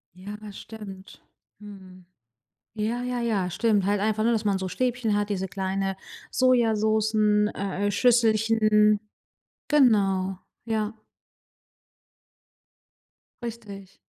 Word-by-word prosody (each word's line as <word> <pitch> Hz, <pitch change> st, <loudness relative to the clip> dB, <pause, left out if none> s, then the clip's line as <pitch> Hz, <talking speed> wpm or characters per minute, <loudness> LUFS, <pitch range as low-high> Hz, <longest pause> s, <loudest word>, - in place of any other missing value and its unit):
Ja, 200 Hz, +3 st, -8 dB
das 205 Hz, -2 st, -9 dB
stimmt. 195 Hz, -4 st, -11 dB, 0.4 s
Mhm. 190 Hz, -3 st, -13 dB, 0.7 s
Ja, 225 Hz, +3 st, -2 dB
ja, 250 Hz, -1 st, -2 dB
ja, 205 Hz, -6 st, 0 dB
stimmt. 205 Hz, 0 st, +1 dB
Halt 205 Hz, 0 st, +1 dB
einfach, 215 Hz, +1 st, 0 dB
ne, 235 Hz, -, +3 dB
dass 220 Hz, -2 st, 0 dB
man 200 Hz, -2 st, +2 dB
so 190 Hz, 0 st, -4 dB
Stäbchen 245 Hz, 0 st, -1 dB
hat, 205 Hz, 0 st, -1 dB
diese 190 Hz, -1 st, -2 dB
kleine 195 Hz, 0 st, -2 dB, 0.3 s
Sojasoßen, 220 Hz, -4 st, +2 dB
äh, 200 Hz, +1 st, -3 dB
äh, -, -, 0 dB
Schüsselchen. 215 Hz, -2 st, +3 dB, 0.7 s
Genau, 195 Hz, -9 st, +3 dB, 0.3 s
ja. 220 Hz, -1 st, -2 dB, 2.5 s
Richtig. 205 Hz, -5 st, -8 dB
210 Hz, 105 wpm, -25 LUFS, 195-225 Hz, 2.5 s, ne